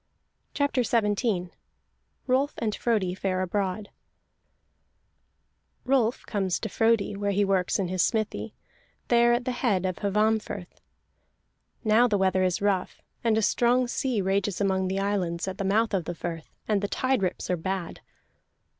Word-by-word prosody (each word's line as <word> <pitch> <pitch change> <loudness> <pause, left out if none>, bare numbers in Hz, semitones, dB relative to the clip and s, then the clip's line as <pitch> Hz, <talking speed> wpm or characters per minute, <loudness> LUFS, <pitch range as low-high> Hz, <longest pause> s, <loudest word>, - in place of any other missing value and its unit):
CHAPTER 285 -3 +1
XVII 210 -5 0 0.7
ROLF 270 +3 +1
AND 215 -2 -1
FRODI 210 -7 0
FARE 185 0 -1
ABROAD 200 +2 -2 2.0
Rolf 250 -3 +1
comes 195 -4 -1
to 220 - -4
Frodi 225 -2 +2
where 200 0 -2
he 200 +1 +2
works 190 -2 +1
in 195 -3 -1
his 185 0 0
smithy, 220 +1 -1 0.5
there 240 0 +5
at 240 +1 0
the 255 - 0
head 215 -7 0
of 185 -1 -2
Hvammfirth. 210 -2 -1 1.0
Now 225 +2 +5
the 210 -3 +1
weather 190 -1 +2
is 185 +1 0
rough, 195 -3 -1 0.2
and 225 -2 +2
a 220 - +1
strong 245 +3 +3
sea 240 -3 -1
rages 195 0 0
among 190 -2 +1
the 190 +1 -2
islands 190 -3 -1
at 190 0 -5
the - - -1
mouth 215 +3 +1
of 185 -4 0
the 175 - -4
firth, 165 -1 -6 0.2
and 210 -2 +1
the 205 - -1
tide 260 +2 0
rips 185 -1 -2
are - - +2
bad. 185 +1 -4
200 Hz, 155 wpm, -27 LUFS, 185-230 Hz, 2.0 s, there